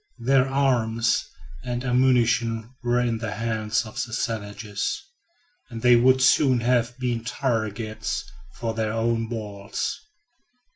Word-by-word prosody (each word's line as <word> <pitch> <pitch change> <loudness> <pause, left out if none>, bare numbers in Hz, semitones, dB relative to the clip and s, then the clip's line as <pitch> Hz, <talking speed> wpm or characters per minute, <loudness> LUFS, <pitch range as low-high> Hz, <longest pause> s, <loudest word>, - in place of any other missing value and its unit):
Their 130 +2 +3
arms 120 -4 +2 0.4
and 120 0 -3
ammunition 120 -2 +2
were 120 0 +1
in 120 -2 0
the 110 -2 -3
hands 110 +1 -1
of 110 +4 -5
the 120 -3 -8
savages, 105 -3 -3 0.7
and 115 -1 -7
they 125 -1 +7
would 130 +2 +4
soon 130 -1 +4
have 120 0 +1
been 120 -3 -2
targets 110 -3 -2 0.3
for 115 -1 -3
their 110 -1 -1
own 115 0 0
balls. 105 - -4
115 Hz, 125 wpm, -25 LUFS, 110-125 Hz, 0.7 s, they